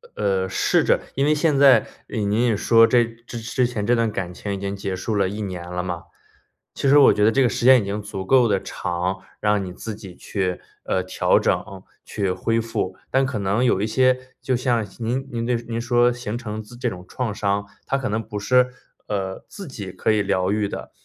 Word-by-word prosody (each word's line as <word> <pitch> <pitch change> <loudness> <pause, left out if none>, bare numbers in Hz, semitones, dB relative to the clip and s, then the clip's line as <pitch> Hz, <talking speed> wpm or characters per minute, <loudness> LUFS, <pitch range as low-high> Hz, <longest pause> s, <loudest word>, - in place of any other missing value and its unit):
呃， 95 -2 0
试 - - +2
着 - - +3 0.2
因 135 - +2
为 150 - +4
现 150 -1 +2
在， 140 -1 +6 0.2
呃， - - -5
您 105 +2 +1
也 110 -3 +1
说 115 +2 +6
这 120 0 +4
之 120 +2 -3
前 110 -4 -3
这 120 - +4
段 115 -2 +1
感 90 -3 -4
情 100 +2 -5
已 - - -3
经 100 +1 -4
结 100 -1 -4
束 100 +4 -3
了 100 -2 +2
1 105 +2 -5
年 90 -3 -5
了 90 0 -2
嘛。 90 -2 -4 0.7
其 140 - 0
实 145 - +7
我 140 - +7
觉 105 - +1
得 110 - +5
这 135 - +2
个 130 - +5
时 - - -3
间 130 -1 +8
已 - - -5
经 100 +2 -3
足 95 -2 -6
够 125 +1 +4
地 100 -2 +1
长， 90 +1 -3 0.2
让 105 -1 +1
你 90 - -6
自 105 +4 -6
己 95 -4 -11
去， 95 -3 -2 0.2
呃， 95 - 0
调 95 - +2
整， - - +1 0.4
去 100 -3 -2
恢 115 +5 0
复。 110 -5 -3
但 135 +1 +2
可 130 -5 -3
能 100 +4 +1
有 120 -6 +3
一 105 - 0
些 130 +2 +1
就 130 - -1
像 120 -3 0
您 125 +4 -2
您 115 -1 -3
这 125 - +2
您 115 0 -4
说 120 +1 +3
形 120 -2 -4
成 110 -3 -5
自 110 +3 -13
这 120 0 -1
种 90 -4 -9
创 120 -1 -3
伤， 100 0 -1 0.2
它 135 - 0
可 130 -3 -3
能 110 +2 -1
不 110 -1 -7
是 125 +5 +3 0.4
呃， 95 -2 -3
自 200 - -9
己 100 - -7
可 95 +3 0
以 105 -1 +2
疗 95 -1 0
愈 105 0 +1
的。 - - -7
110 Hz, 240 characters per minute, -22 LUFS, 100-120 Hz, 0.7 s, 间